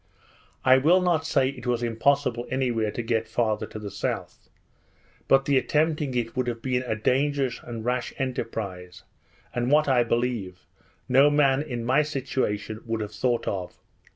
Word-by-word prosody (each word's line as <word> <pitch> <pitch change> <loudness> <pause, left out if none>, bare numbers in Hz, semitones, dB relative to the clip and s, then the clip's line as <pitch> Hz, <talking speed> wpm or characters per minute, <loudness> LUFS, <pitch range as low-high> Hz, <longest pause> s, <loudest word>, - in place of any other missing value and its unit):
I 130 0 +7
will 165 +7 +5
not 170 -3 +1
say 130 -4 +2
it 130 -2 -8
was 120 -1 0
impossible 120 +1 +1
any 130 -1 0
where 110 -2 0
to 120 - -4
get 115 -1 0
farther 110 -1 -1
to - - -9
the 105 -2 -6
south; - - -4 0.8
but 135 0 +4
the 140 -2 +4
attempting 150 -2 0
it 115 -2 -2
would 130 -1 -1
have 120 -1 -4
been 125 -1 0
a 110 - 0
dangerous 135 +3 0
and 115 -2 -7
rash 125 0 -1
enterprise, 105 -8 -4 0.5
and 120 0 -1
what, 150 +1 +4
I 130 -3 +4
believe, 115 -6 -2 0.4
no 135 +3 +6
man 140 -2 +3
in 120 -6 -4
my 130 +5 +4
situation 125 -7 -2
would 115 -1 -2
have 105 0 -5
thought 120 +1 0
of. 90 -3 -4
125 Hz, 170 wpm, -26 LUFS, 115-135 Hz, 0.8 s, I